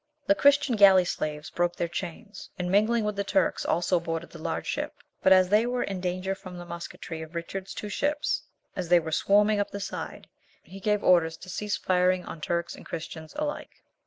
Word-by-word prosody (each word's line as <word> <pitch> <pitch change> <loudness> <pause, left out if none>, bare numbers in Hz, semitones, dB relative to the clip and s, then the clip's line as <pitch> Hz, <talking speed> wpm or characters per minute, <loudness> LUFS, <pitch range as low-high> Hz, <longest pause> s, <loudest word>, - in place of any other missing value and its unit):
The 295 - +5
Christian 285 -3 +4
galley 190 -3 +7
slaves 150 -3 -3
broke 175 0 0
their 170 - -1
chains, 190 +5 -7
and 180 0 -2
mingling 215 +3 +3
with 210 -1 -1
the 200 - 0
Turks 195 -1 +1
also 175 +1 +1
boarded 165 0 -4
the - - -11
large - - -3
ship, - - -3 0.3
but 190 - +4
as 185 -1 +6
they 215 +4 +4
were 245 0 0
in 195 -2 -4
danger 185 +1 -1
from 185 -2 -10
the 175 - -8
musquetry 170 -1 -7
of 160 +1 -10
Richard's 185 +3 -5
two 210 - -5
ships 290 +8 0 0.3
as 180 -3 -4
they 175 0 +7
were 160 -1 -5
swarming 205 +5 +3
up 205 - 0
the 200 - -6
side, 200 - -6 0.4
he 195 +2 -11
gave 210 +1 0
orders 165 -3 +4
to 185 - -12
cease 210 +2 -2
firing 180 0 +2
on 160 - -8
Turks 170 +2 -2
and - - -12
Christians 160 -1 -7
alike. 300 0 -5
185 Hz, 205 wpm, -27 LUFS, 170-210 Hz, 0.4 s, galley